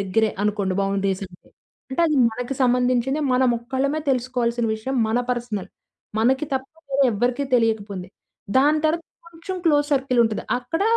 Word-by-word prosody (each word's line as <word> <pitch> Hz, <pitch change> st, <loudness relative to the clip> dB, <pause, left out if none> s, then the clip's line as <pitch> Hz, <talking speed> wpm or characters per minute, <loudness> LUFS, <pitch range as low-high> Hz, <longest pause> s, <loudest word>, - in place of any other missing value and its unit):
దగ్గరే 215 Hz, +3 st, +1 dB
అనుకోండి 200 Hz, -2 st, 0 dB
బౌండరీస్ 195 Hz, 0 st, -1 dB
అంటే. 180 Hz, -1 st, -19 dB, 0.4 s
అంటే 265 Hz, -, -1 dB
అది 305 Hz, -, +1 dB
మనకి 245 Hz, +4 st, -4 dB
సంబంధించినదే 250 Hz, +3 st, +2 dB
మనం 255 Hz, 0 st, +3 dB
ఒక్కళ్ళమే 270 Hz, +5 st, -1 dB
తెలుసుకోవాల్సిన 245 Hz, -2 st, 0 dB
విషయం 220 Hz, +5 st, -4 dB
మన 225 Hz, +2 st, +1 dB
పర్సనల్. 235 Hz, -5 st, -3 dB, 0.5 s
మనకి 260 Hz, +6 st, +2 dB
తప్ప 265 Hz, 0 st, -2 dB, 0.2 s
వేరే 275 Hz, 0 st, +3 dB
ఎవ్వరికీ 245 Hz, +6 st, 0 dB
తెలియకపోయింది. 210 Hz, -5 st, 0 dB, 0.5 s
దాని 295 Hz, +3 st, +4 dB
తర్వాత 325 Hz, +2 st, +1 dB, 0.2 s
కొంచెం 340 Hz, +3 st, -7 dB
క్లోజ్ 290 Hz, -3 st, +3 dB
సర్కిల్ 265 Hz, -3 st, +2 dB
ఉంటది. 220 Hz, -2 st, -2 dB, 0.2 s
అక్కడ 255 Hz, +9 st, -3 dB
245 Hz, 140 wpm, -23 LUFS, 220-270 Hz, 0.5 s, దాని